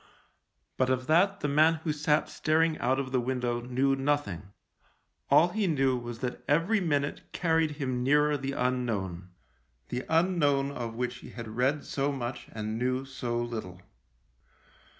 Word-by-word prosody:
But 130 Hz, 0 st, +2 dB
of 130 Hz, 0 st, 0 dB
that 195 Hz, +6 st, +3 dB
the -, -, 0 dB
man 155 Hz, +3 st, +4 dB
who 155 Hz, -, 0 dB
sat 150 Hz, 0 st, +1 dB
staring 160 Hz, +1 st, +1 dB
out 130 Hz, +2 st, +1 dB
of 130 Hz, -1 st, -3 dB
the 130 Hz, -2 st, +2 dB
window 120 Hz, -1 st, -1 dB
knew 130 Hz, +3 st, +1 dB
nothing. 135 Hz, -, -1 dB, 0.8 s
All 175 Hz, -, +6 dB
he 210 Hz, +1 st, 0 dB
knew 135 Hz, -5 st, +2 dB
was 120 Hz, -1 st, -6 dB
that 125 Hz, -1 st, -4 dB
every 170 Hz, +9 st, +3 dB
minute 145 Hz, -6 st, -1 dB
carried 160 Hz, -3 st, +1 dB
him 130 Hz, -4 st, -2 dB
nearer 150 Hz, +3 st, +3 dB
the 135 Hz, -1 st, -3 dB
unknown 110 Hz, -9 st, -2 dB, 0.3 s
— -, -, -42 dB
the 125 Hz, -, -3 dB
unknown 160 Hz, -5 st, +2 dB
of 120 Hz, -4 st, -5 dB
which 125 Hz, +1 st, -2 dB
he -, -, -11 dB
had 115 Hz, -2 st, -8 dB
read 130 Hz, +6 st, 0 dB
so 140 Hz, +1 st, -1 dB
much 125 Hz, -2 st, -5 dB
and 110 Hz, 0 st, -4 dB
knew 130 Hz, +2 st, 0 dB
so 125 Hz, -3 st, -3 dB
little. 110 Hz, -7 st, -6 dB
130 Hz, 160 wpm, -29 LUFS, 120-150 Hz, 0.8 s, All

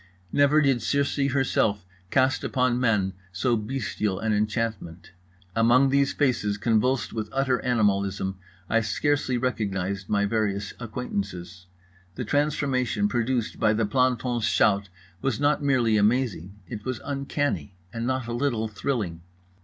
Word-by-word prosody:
Never 145 Hz, +2 st, +4 dB
did 135 Hz, -4 st, +2 dB
Circe 140 Hz, 0 st, 0 dB
herself 110 Hz, -7 st, +1 dB, 0.2 s
cast 130 Hz, +5 st, +2 dB
upon 125 Hz, -2 st, +1 dB
men 105 Hz, -6 st, +1 dB, 0.2 s
so 120 Hz, +7 st, +1 dB
bestial 105 Hz, -3 st, -2 dB
an 110 Hz, 0 st, 0 dB
enchantment. 105 Hz, -5 st, -2 dB, 0.4 s
Among 120 Hz, +4 st, +4 dB
these 140 Hz, 0 st, +3 dB
faces 115 Hz, -8 st, 0 dB
convulsed 115 Hz, +4 st, +1 dB
with 110 Hz, -1 st, -3 dB
utter 135 Hz, -2 st, +1 dB
animalism 100 Hz, -5 st, 0 dB, 0.3 s
I 115 Hz, +3 st, +2 dB
scarcely 130 Hz, +3 st, 0 dB
recognised 100 Hz, -6 st, -2 dB
my 100 Hz, -1 st, +2 dB
various 100 Hz, -2 st, -1 dB
acquaintances. 95 Hz, -6 st, -5 dB, 0.5 s
The 125 Hz, -, -4 dB
transformation 135 Hz, -5 st, +1 dB
produced 120 Hz, +1 st, -1 dB
by 105 Hz, -, +3 dB
the 110 Hz, 0 st, +1 dB
planton's 125 Hz, 0 st, +1 dB
shout 100 Hz, -3 st, +2 dB, 0.3 s
was 135 Hz, -3 st, -1 dB
not 145 Hz, +1 st, +2 dB
merely 125 Hz, -6 st, +2 dB
amazing; 105 Hz, -4 st, +1 dB
it 105 Hz, -3 st, -7 dB
was 130 Hz, -1 st, -3 dB
uncanny, 140 Hz, -, -2 dB, 0.2 s
and 115 Hz, 0 st, -3 dB
not 130 Hz, -1 st, -1 dB
a 120 Hz, -, -4 dB
little 120 Hz, -3 st, 0 dB
thrilling. 105 Hz, -5 st, -3 dB
115 Hz, 130 wpm, -26 LUFS, 105-130 Hz, 0.5 s, Never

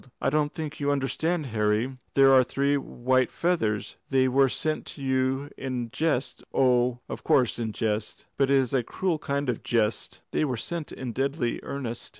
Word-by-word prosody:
"I -, -, +1 dB
don't 150 Hz, 0 st, +1 dB
think 155 Hz, -2 st, -6 dB
you 145 Hz, -1 st, 0 dB
understand, 150 Hz, +4 st, 0 dB
Harry. 110 Hz, +2 st, 0 dB, 0.2 s
Here 135 Hz, -1 st, +7 dB
are 130 Hz, -1 st, +7 dB
three 140 Hz, +3 st, +1 dB
white 130 Hz, -2 st, +1 dB
feathers. 110 Hz, -, -1 dB
They 130 Hz, -1 st, +3 dB
were 135 Hz, +1 st, +4 dB
sent 155 Hz, +4 st, -2 dB
to 145 Hz, -, -9 dB
you 130 Hz, +2 st, 0 dB
in 125 Hz, -3 st, -3 dB
jest? 145 Hz, -3 st, -1 dB
Oh, 125 Hz, -2 st, +3 dB
of -, -, -6 dB
course 125 Hz, -3 st, +2 dB
in 115 Hz, -2 st, -2 dB
jest. 105 Hz, 0 st, -2 dB
But 135 Hz, -1 st, +2 dB
it 140 Hz, -, +5 dB
is 130 Hz, -2 st, +2 dB
a 130 Hz, -, +3 dB
cruel 165 Hz, +7 st, -2 dB
kind 140 Hz, -1 st, -2 dB
of 125 Hz, -3 st, -1 dB
jest 110 Hz, -2 st, -1 dB
" -, -, -53 dB
"They -, -, +1 dB
were 130 Hz, -5 st, -1 dB
sent 165 Hz, +6 st, -4 dB
in 130 Hz, -2 st, -5 dB
deadly 135 Hz, -1 st, -1 dB
earnest." 125 Hz, -4 st, -5 dB
130 Hz, 185 wpm, -27 LUFS, 120-145 Hz, 0.2 s, Here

